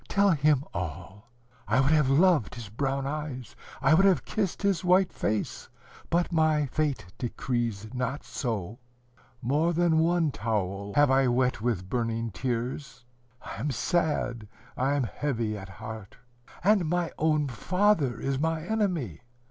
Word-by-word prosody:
Tell 200 0 +3
him 150 -3 +3
all: 95 +6 -6 0.4
I - - +3
would 135 +2 +3
have 150 -4 +4
loved 155 - +3
his 115 -4 -8
brown 135 +4 -2
eyes, 140 -5 -5 0.3
I 135 +3 +5
would 190 +5 +5
have 190 - +2
kissed 205 -3 -2
his 195 -3 +1
white 185 +1 +3
face, 105 0 -2 0.4
but 175 +1 +1
my 155 -2 +3
fate 140 -4 -1
decrees 120 -4 -2
not 125 +3 -2
so. 110 -3 -4 0.6
More 150 +7 +2
than 170 -1 +3
one 165 -1 +2
towel 100 -4 -2
have 145 -2 +5
I 135 0 +4
wet 125 -1 +1
with 110 -6 -1
burning 115 0 -2
tears. 125 +2 -4 0.4
I - - -7
am 140 +7 -1
sad, 135 - -1 0.3
I 135 +3 +1
am 140 - +1
heavy 115 -4 -2
at 95 -1 -8
heart. 110 0 -9 0.5
And 195 -4 +3
my 175 -1 0
own 155 -2 +2
father 150 - +1
is 135 -1 -1
my 160 +1 0
enemy. 175 - -1
135 Hz, 150 wpm, -28 LUFS, 115-160 Hz, 0.6 s, I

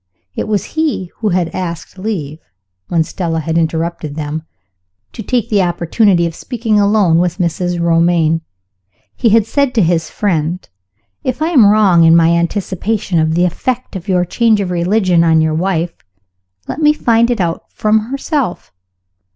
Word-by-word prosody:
It - - -3
was 205 -3 0
he 305 - -1
who 215 - -1
had 175 -2 -1
asked 175 0 -6
leave 165 -8 -4 0.5
(when 165 -2 +1
Stella 165 0 -3
had 160 +1 -3
interrupted 160 -2 -2
them) 155 0 -4 0.7
to - - -7
take 235 0 -1
the 205 -3 +2
opportunity 175 +1 +1
of 165 - -3
speaking 225 +1 -1
alone 200 -5 +3
with 175 -1 0
Mrs. 175 0 -1
Romayne. 165 -1 +2 0.7
He 235 - +1
had 220 0 +4
said 280 +2 0
to 220 - +3
his 165 -2 0
friend, 175 -3 -2 0.6
"If 255 +1 -2
I 315 +1 0
am 255 -11 +5
wrong 200 -5 +4
in 165 0 +6
my 165 -1 +5
anticipation 185 +2 -1
of 160 0 +1
the 175 +1 +3
effect 245 +7 -3
of 190 +1 -7
your 180 -2 +1
change 225 +3 +2
of 190 -3 -2
religion 180 0 +2
on 160 -1 +3
your 160 0 +1
wife, 170 0 -1 0.7
let - - -5
me 300 0 +5
find 235 -5 +2
it 240 -3 -1
out 170 -2 -3
from 215 +1 +1
herself. 275 - -3
180 Hz, 165 wpm, -15 LUFS, 165-215 Hz, 0.7 s, in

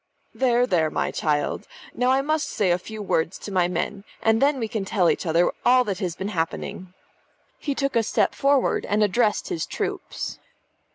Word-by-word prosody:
"There, 245 -1 +3
there, 170 -8 +2
my - - -1
child. 145 -2 -1 0.3
Now 250 +1 +1
I 265 +1 +3
must 310 +1 0
just - - -8
say 195 -4 +3
a 175 - +2
few 215 +3 -7
words 165 -2 0
to 205 - -8
my 180 -2 +2
men, 180 +3 -3 0.2
and 225 0 +2
then 280 +1 +3
we 230 -3 -2
can 215 -1 -3
tell 190 -3 +2
each - - -3
other 165 +2 +3
all 250 +1 +5
that 200 -5 -3
has 175 -3 -2
been 190 +2 -4
happening." 180 +1 -4 0.6
He 285 -3 -2
took 275 -2 -1
a 230 - +5
step 220 - +1
forward 275 -1 +2
and 210 +1 +2
addressed 210 +1 +1
his 165 - -2
troops. - - -4
210 Hz, 195 wpm, -24 LUFS, 180-250 Hz, 0.6 s, all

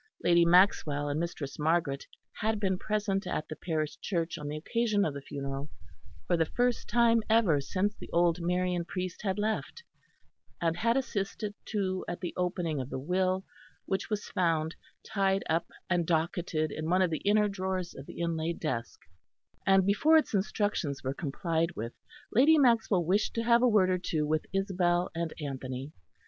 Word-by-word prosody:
Lady 170 0 +5
Maxwell 170 -5 +4
and 145 +2 -1
Mistress 160 -5 -4
Margaret 155 -3 0 0.3
had 215 0 0
been 190 -3 0
present 205 -2 -1
at 155 - -2
the 155 - -6
parish 155 -3 -3
church 170 -4 -2
on 145 - -6
the 150 +1 -3
occasion 210 +4 +1
of 150 - -1
the 140 - -6
funeral, 140 0 -5 0.6
for 175 - +2
the 165 -2 +1
first 245 +4 0
time 235 -1 +4
ever 210 -10 +4
since 195 +9 -1
the - - -11
old 170 0 +2
Marian 180 0 0
priest 180 +1 -5
had 195 -2 -1
left; 220 - -2 0.8
and 165 -1 +1
had 230 +5 +2
assisted 210 -4 -2
too 190 -3 -1
at 175 - -4
the 175 - -4
opening 175 -5 -1
of 130 - -6
the - - -4
will, 185 +6 0 0.4
which 190 +1 -2
was 210 -1 -2
found, 165 -4 0 0.3
tied 195 -2 +1
up 165 +1 0 0.2
and 175 -3 +1
docketed 160 -2 0
in 155 +2 -4
one 185 +2 +4
of 180 - +1
the 155 - -1
inner 210 +1 +3
drawers 190 -2 -3
of 135 - -10
the - - -7
inlaid 165 0 -1
desk; 125 -8 -3 0.7
and 195 -1 +5
before 295 +11 +5
its 310 - +1
instructions 195 -7 -1
were 130 +1 -1
complied 165 +3 -1
with, 115 +2 -5 0.4
Lady 290 +8 +6
Maxwell 230 - +3
wished 200 +5 +1
to 230 - 0
have 235 0 +4
a 250 - +5
word 195 -4 +4
or 180 - +1
two 155 -3 -1
with 155 +1 -1
Isabel 180 -2 +1
and 165 -1 -2
Anthony. 135 -1 -5
180 Hz, 175 wpm, -30 LUFS, 155-200 Hz, 0.8 s, Lady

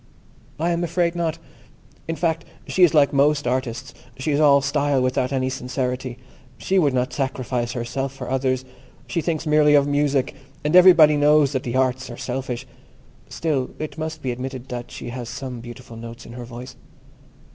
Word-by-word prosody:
I 170 +2 +1
am 170 0 0
afraid 170 0 +1
not. 170 -2 -1 0.7
In 165 - -2
fact, 165 -1 0 0.2
she 190 - -1
is 170 -3 +6
like 145 -2 +5
most 145 +1 +3
artists; 125 0 -2 0.2
she 140 +4 -2
is 145 - +2
all 145 -2 +6
style, 140 0 +1
without 130 0 0
any 130 -1 0
sincerity. 125 -1 -3 0.4
She 190 0 +1
would 145 -6 +2
not 125 0 0
sacrifice 125 -3 -2
herself 130 +3 -3
for 135 - -8
others. 130 0 0 0.4
She 170 - -2
thinks 160 -1 -2
merely 150 -1 +5
of 140 -1 +5
music, 145 -2 +1 0.3
and 150 +3 +1
everybody 170 -5 +8
knows 145 -1 +4
that 130 -3 -1
the 120 0 -4
arts 130 0 +1
are 120 - -8
selfish. 125 -1 -4 0.6
Still, 145 -6 -1
it 155 -2 -5
must 155 -1 -5
be 130 - -1
admitted 130 +1 -6
that 120 -1 -5
she - - -7
has 120 -1 -6
some 130 -3 -6
beautiful 120 0 -10
notes 115 +1 -9
in 115 - -10
her 120 0 -7
voice. 125 +2 -9
135 Hz, 180 wpm, -22 LUFS, 125-150 Hz, 0.7 s, everybody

